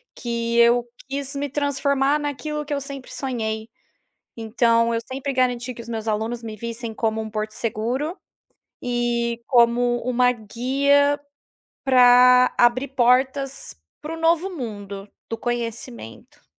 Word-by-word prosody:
que 235 -1 -2
eu 235 +1 +5 0.2
quis 280 +1 -4
me 285 0 -2
transformar 280 0 +1
naquilo 295 +1 -4
que 290 - -4
eu 280 - -1
sempre 275 -2 -8
sonhei. 225 -4 -3 0.7
Então, 230 +1 +2
eu 230 - 0
sempre 275 +1 -3
garanti 255 -1 0
que 235 - -9
os 235 - -11
meus 225 -1 -4
alunos 225 +2 -2
me 220 -1 -6
vissem 230 +1 -6
como 220 0 -1
um 220 - -6
porto 215 0 -3
seguro 240 - -2 0.7
e 240 -1 -1
como 240 -1 +3
uma 250 0 +3
guia 275 +6 +1 0.6
pra 250 -1 +6
abrir 245 +3 +3
portas 265 +2 +1 0.3
para 310 +2 -6
o - - -9
novo 335 +3 +2
mundo, 205 - -7 0.2
do 225 - -4
conhecimento. 230 - -6
245 Hz, 135 wpm, -23 LUFS, 230-275 Hz, 0.7 s, pra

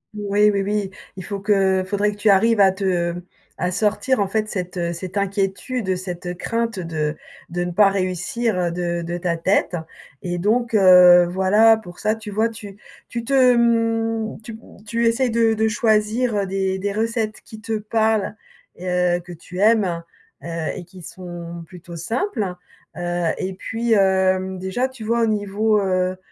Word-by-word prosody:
Ouais, 210 0 +2
oui, 200 -1 0
oui. 200 -1 -2 0.3
Il 185 - -6
faut 200 -1 -4
que 195 -2 +2
il 185 - -7
faudrait 205 +1 +1
que 205 - -11
tu 210 0 +2
arrives 220 +3 +4
à 195 -1 +6
te 180 -3 -1 0.4
à 180 - -1
sortir, 215 +6 +1
en 200 - +1
fait, 215 +2 -1
cette, 180 -1 -4
heu, 170 -1 -1
cette 185 +3 -7
inquiétude, 200 +3 -2
heu, 185 - +2
cette 180 -1 -5
crainte, 230 +1 -2
heu, - - -4
de 155 -2 -2 0.3
de 175 +1 -2
ne 175 - -3
pas 200 +3 +5
réussir, 195 +4 -1
heu, 175 -1 0
de 175 0 -2
de 170 +1 -4
ta 170 -1 -1
tête, 185 +1 +1 0.5
et 175 -1 -2
donc, 230 +5 +1
heu, 180 -2 +8
voilà, 200 +5 +4
pour 180 -5 -12
ça, 215 +1 +1
tu 220 -1 -9
vois, 220 +3 +1
tu 205 -3 -10 0.3
tu 235 -1 -4
te 255 -1 +4
mmh, 225 -1 0
tu 225 - -9
m - - -9 0.3
tu 230 +2 -1
essaies 245 +2 +2
de 225 -1 +2
de 220 +1 +1
choisir, 220 +1 +1
heu, 200 - 0
des 190 0 -1
des 200 +1 -2
recettes 220 0 -2
qui 220 -5 -12
te 225 -1 -4
parlent 220 -1 0 0.4
et 180 +1 -8
heu, 180 -1 +1
que 175 0 -12
tu 175 +2 -11
aimes, 200 -6 +2 0.4
heu - - -7 0.3
et 185 - -7
qui 185 +1 -14
sont 175 -3 -8
plutôt 175 0 -11
simples. 215 - -2 0.4
Heu 175 0 -2 0.2
et 190 0 -3
puis, 225 +4 -2
hem, 190 -1 +2
déjà 190 +8 -1
tu 260 -4 -11
vois 235 +2 +1
au - - +2
niveau, 210 0 +1
heu, 185 -1 0
200 Hz, 185 wpm, -21 LUFS, 180-220 Hz, 0.5 s, heu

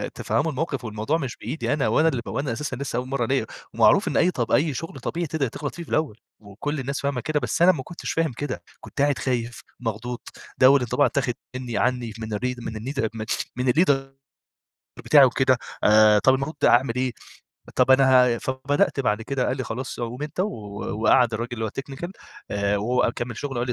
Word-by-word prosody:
تفهموا 160 - 0
الموقف 140 -2 -3
والموضوع 110 +8 -1
مش 130 -6 -5
بإيدي 155 - -2
أنا 145 - +1
وأنا 160 - +3
ال 135 -7 0
وأنا 135 -3 -2
أساسًا 150 +5 -4
لسه 135 -2 -4
أول 125 +1 -2
مرة 130 -3 -1
ليا 130 -1 0 0.3
ومعروف - - +4
إن - - 0
أي 180 - +4
طب 120 -6 -2
أي 150 0 +3
شغل 140 +1 -6
طبيعي 170 +6 -3
تقدر 145 -2 -1
تغلط 145 +4 -6
فيه 170 - -6
في - - -14
الأول 150 -9 0 0.2
وكل 115 +9 -5
الناس 140 +2 -3
فاهمة 140 -3 -1
كده 155 +2 0
بس 125 +4 -2
أنا 180 +2 +8
ما 145 -7 -4
كنتش 170 +5 -6
فاهم 165 -3 0
كده، 130 +2 -5 0.2
كنت 140 - -6
قاعد 145 -1 +2
خايف 120 -2 -2 0.2
مخضوض، 120 +1 -4 0.4
ده 130 - +7
أول 140 0 +6
انطباع 125 +4 +2
اتاخد 125 -3 0 0.2
مني 125 -4 -4
عني 120 0 0
من 110 -1 -5
الري 125 +4 -1
من 115 -1 -6
الني 130 +6 -5 0.6
من 125 0 +2
الLeader 160 -2 +4 1.1
بتاعي 145 -3 +7
وكده 130 0 +3 0.3
آآ، 105 0 +6
طَب 130 +5 +4
المفروض 135 +3 -3
أعمل 120 0 +4
إيه؟ 130 -1 0 0.6
طب - - +3
أنا 130 -2 +5
ه - - -6
فبدأت 135 +3 0
بعد 115 -4 0
كده 130 +1 -1
قال 130 - -1
لي 130 - -3
خلاص 125 +2 -5
قُم 120 +3 -4
أنت 150 +4 -4
و 200 - +1 0.5
وقعد 120 -2 +4
الراجل 115 +2 -3
اللي 115 -2 -3
هو 110 - -1
الTechnical 135 - -6 0.4
آآ، 100 0 0
وهو 120 +3 +1
كمل 120 -1 -4
شغل 140 -3 -4
وقال 120 - -1
لي: 125 - 0
130 Hz, 205 wpm, -24 LUFS, 120-140 Hz, 1.1 s, أنا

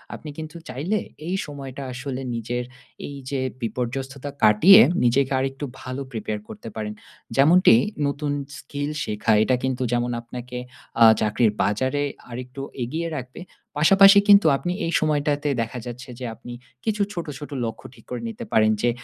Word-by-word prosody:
আপনি 155 - -9
কিন্তু 160 +1 -7
চাইলে 180 +11 -1 0.3
এই 180 - -1
সময়টা 140 -2 -7
আসলে 130 +1 -5
নিজের 120 +2 -3 0.4
এই 145 - -8
যে 140 - -2 0.2
বিপর্যস্ততা 130 +4 -4
কাটিয়ে 170 - +8 0.2
নিজেকে 130 +3 +2
আরেকটু 135 +2 -3 0.2
ভালো 130 +2 -5
Prepare 110 -2 -4
করতে 110 +2 -8
পারেন। 105 -1 -4 0.4
যেমনটি 155 +1 +6 0.3
নতুন 145 +1 -2 0.3
স্কিল 145 +1 -4
শেখা। 105 +1 -1
এটা 130 - +2
কিন্তু 130 -1 -1
যেমন 120 0 0
আপনাকে 125 +1 -8 0.4
আ - - +10 0.2
চাকরির 110 +1 +2
বাজারে 130 +8 0 0.3
আরেকটু 125 +2 -7 0.2
এগিয়ে 160 +8 -3
রাখবে 130 +4 -8 0.4
পাশাপাশি 195 +6 +7
কিন্তু 200 -2 +7
আপনি 175 - -3
এই 165 - -1
সময়টাতে 150 -1 0
দেখা 115 +2 -4
যাচ্ছে 125 +1 -8
যে 130 - -5
আপনি 120 - -10 0.3
কিছু 215 -1 0
ছোট, 170 -3 -4
ছোট 145 - -8 0.2
লক্ষ্য 115 +3 -6
ঠিক - - -19
করে 125 - -4
নিতে 230 +1 -7
পারেন 110 0 +4
যে 120 - +3
130 Hz, 155 wpm, -23 LUFS, 120-150 Hz, 0.4 s, আ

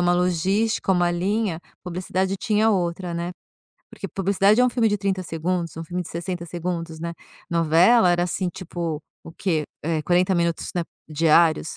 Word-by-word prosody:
uma 175 0 +3
logística, 190 +4 +1
uma 175 -1 +2
linha, 185 0 -1 0.2
publicidade 185 +2 -2
tinha 220 0 +2
outra, 175 -2 -1
né. 170 +1 -3 0.6
Porque 195 - -7
publicidade 195 +5 +3
é - - +6
um 250 - +4
filme 235 -2 +2
de 205 - +1
30 190 -1 -1
segundos, 170 0 -3
um 165 - -5
filme 180 +2 -3
de 170 - -10
60 175 +1 -4
segundos, 170 -1 -4
né, 170 0 -3 0.4
novela 170 +5 +5
era, 175 0 +2
assim, 180 +1 -2
tipo, 170 -4 -4 0.2
o 165 - -10
quê? 165 -3 -1 0.2
Eh, 160 0 -1
40 180 +3 +2
minutos, 170 -1 0
né, 175 - 0 0.3
diários, 160 +1 +3
175 Hz, 170 wpm, -23 LUFS, 170-190 Hz, 0.6 s, é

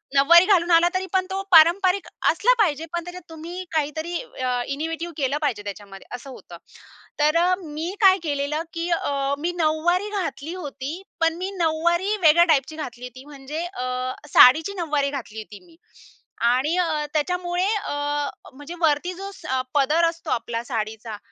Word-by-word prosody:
नऊवारी 340 +6 +7
घालून 360 -4 +3
आला 335 +1 +6
तरी 375 0 -1
पण 375 -1 +2
तो 385 +1 -2
पारंपरिक 360 +4 +5 0.2
असला - - +3
पाहिजे, 325 -7 +1
पण 345 -1 -2
त्याच्यात 355 +1 -9
तुम्ही 335 +3 -7
काहीतरी 315 +3 -2
अ, 255 - -3
इनोव्हेटिव्ह 325 +4 -4
केलं 275 0 0
पाहिजे 235 -9 -1
त्याच्यामध्ये 200 -1 -9
असं 250 +2 -10
होतं. 260 - -11 0.6
तर 300 +2 +3
अ, 355 +2 +3
मी 315 +3 -5
काय 385 -1 +7
केलेलं, 290 0 -2
की 335 +1 -3
अ, 280 -4 0
मी 340 +4 -1
नऊवारी 345 +5 +1
घातली 300 +1 -5
होती, 280 -5 -6 0.3
पण 330 0 +2
मी 370 +2 -3
नऊवारी 345 +4 +1
वेगळ्या 330 +1 +6
टाइपची 310 -2 +1
घातली 250 -6 -7
होती. 255 +2 -11
म्हणजे 290 +2 -6
अ, 350 -8 -6 0.5
साडीची 315 +9 +7
नऊवारी 295 -5 0
घातली 245 -6 -7
होती 215 -1 -10
मी. 335 -2 -20 0.8
आणि 270 +7 +1
अ, 320 -4 0
त्याच्यामुळे 355 +3 -1
अ, 290 -7 -2 0.2
म्हणजे 290 +5 -9
वरती 320 +3 +1
जो 390 +2 -7
स 260 -7 -3 0.2
पदर 300 +4 +3
असतो 335 0 -9
आपला 230 0 -2
साडीचा 220 -2 -5
315 Hz, 160 wpm, -23 LUFS, 275-345 Hz, 0.8 s, नऊवारी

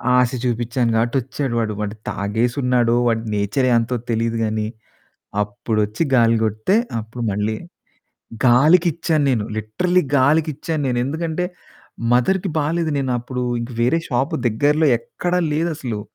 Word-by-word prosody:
ఆశ 125 -1 +4
చూపిచ్చాను 120 0 0
కాబట్టి 115 +2 +1
ఒచ్చాడు 130 0 -3
వాడు. 110 -2 -1
వాడు 105 +1 -3
తాగేసున్నాడో 120 +3 +1
వాడి 115 -1 +1
నేచరే 105 +6 +1
అంతో 115 +2 0
తెలిదు 115 0 0
గాని, 110 -1 -1 0.8
అప్పుడొచ్చి 105 +3 -2
గాలి 115 -2 +4
కొడితే 110 - +1 0.2
అప్పుడు 115 +2 -6
మళ్ళి 105 +2 -1 0.9
గాలికిచ్చాను 155 +4 +4
నేను 115 -5 +1
లిటరల్లి 175 - +1 0.2
గాలికిచ్చాను 155 +2 +1
నేను. 125 -1 0
ఎందుకంటే 160 +4 -2 0.7
మదర్‌కి 185 +11 +2
బాలేదు. 160 +2 0
నేను 130 -2 -1
అప్పుడు 125 +1 -5 0.2
ఇంకా 120 +1 -6
వేరే 125 +8 +3
షాపు 135 +5 0
దగ్గరలో 145 +7 +2
ఎక్కడ 175 +9 -4 0.2
లేదసలు. 150 -8 -2
125 Hz, 125 wpm, -20 LUFS, 115-150 Hz, 0.9 s, ఆశ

